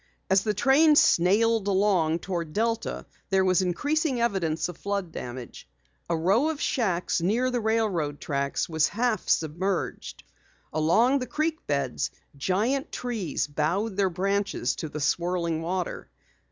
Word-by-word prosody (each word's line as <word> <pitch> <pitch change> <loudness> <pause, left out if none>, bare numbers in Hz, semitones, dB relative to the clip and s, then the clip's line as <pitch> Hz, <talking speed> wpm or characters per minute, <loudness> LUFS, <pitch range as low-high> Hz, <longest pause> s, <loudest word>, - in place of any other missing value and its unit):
As 190 0 +5
the 210 -1 -1
train 295 +7 +5
snailed 215 - +4
along 190 -5 +2
toward 170 -5 -4
Delta, 230 +1 -1 0.2
there 190 -1 +3
was 185 0 +3
increasing 285 - 0
evidence 190 -9 0
of 180 -2 -9
flood 200 -4 -3
damage. 120 - -8 0.4
A 170 - +1
row 200 - +2
of 315 -3 -3
shacks 185 - 0
near 235 +9 +1
the 245 - 0
railroad 210 -10 0
tracks 140 -1 -2
was 160 -2 +2
half 230 -2 -1
submerged. 170 +4 -1 0.5
Along 225 - +3
the 255 - -4
creek 315 +1 -2
beds, 140 -3 -1 0.3
giant 210 - 0
trees 230 -9 -2
bowed 170 +9 -1
their 195 -1 +2
branches 195 -6 -1
to 155 - -4
the 150 - -6
swirling 170 +1 0
water. 180 +1 -3
190 Hz, 140 wpm, -26 LUFS, 165-230 Hz, 0.5 s, As